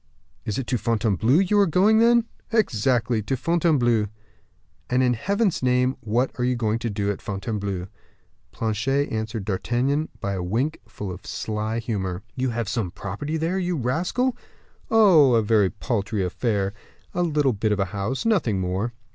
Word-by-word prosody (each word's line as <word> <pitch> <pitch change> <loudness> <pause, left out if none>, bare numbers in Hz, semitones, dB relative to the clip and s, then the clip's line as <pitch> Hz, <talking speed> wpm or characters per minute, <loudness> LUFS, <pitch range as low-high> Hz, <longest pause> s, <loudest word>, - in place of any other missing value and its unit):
"It 105 -3 -2
is 135 - -2
to 125 - 0
Fontainebleau 110 - +2
you 205 +2 +2
are 200 - +5
going, 200 +7 +4
then?" 235 0 +5 0.3
"Exactly; 120 - +1
to 130 +6 -2
Fontainebleau." 130 -8 +2 0.8
"And, 125 +1 +2
in 125 -1 +3
Heaven's 200 - 0
name, 125 +1 +2
what 120 +4 0
are - - +1
you 125 0 +1
going 115 -1 0
to 115 - -2
do 100 -1 -1
at 100 - -6
Fontainebleau?" 100 -2 -3 0.7
Planchet 130 +6 -1
answered 110 -1 -3
D'Artagnan 125 +9 0
by 100 - -2
a 95 - -3
wink 120 - -1
full 105 -3 -6
of 90 +2 -9
sly 110 +1 -3
humor. 100 -5 -3
"You 130 0 0
have 115 -2 -2
some 110 -4 -1
property 105 - -4
there, 165 +4 -1
you 180 -1 -1
rascal." 175 - 0 0.5
"Oh, 175 - +6
a 115 - +3
very 105 -3 +3
paltry 105 -3 -2
affair; 100 +1 -1 0.4
a 175 - 0
little 150 -6 +2
bit 105 +1 -1
of 105 - 0
a 95 - +2
house 105 - -2
nothing 160 - +2
more." 95 +6 -2
120 Hz, 165 wpm, -24 LUFS, 105-145 Hz, 0.8 s, Oh